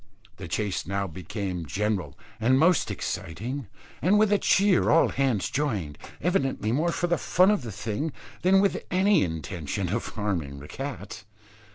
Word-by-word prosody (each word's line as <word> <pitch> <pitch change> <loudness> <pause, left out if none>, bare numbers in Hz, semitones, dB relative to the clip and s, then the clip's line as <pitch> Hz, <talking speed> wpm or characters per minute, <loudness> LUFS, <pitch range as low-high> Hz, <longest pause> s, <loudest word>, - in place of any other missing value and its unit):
The - - -7
chase 100 -5 -2
now 100 +1 -1
became 90 -1 -5
general 100 -6 -2 0.2
and 125 +4 +3
most 165 +3 +4
exciting; 115 - -4 0.3
and 190 +5 +4
with 215 -1 +4
a 205 - +3
cheer 195 -1 +3
all 165 - +5
hands 130 -8 0
joined, 105 - -2 0.2
evidently 135 - 0
more 160 +7 +1
for 175 - -1
the 175 0 +1
fun 185 +3 +4
of 210 - +1
the 115 -3 -6
thing, 110 +9 -3 0.3
than 190 +1 +5
with 200 - +1
any 190 0 +4
intention 85 +2 -3
of 115 +5 -2
harming 85 -10 -3
the 70 - -10
cat. 125 - -6
115 Hz, 160 wpm, -26 LUFS, -, 0.3 s, all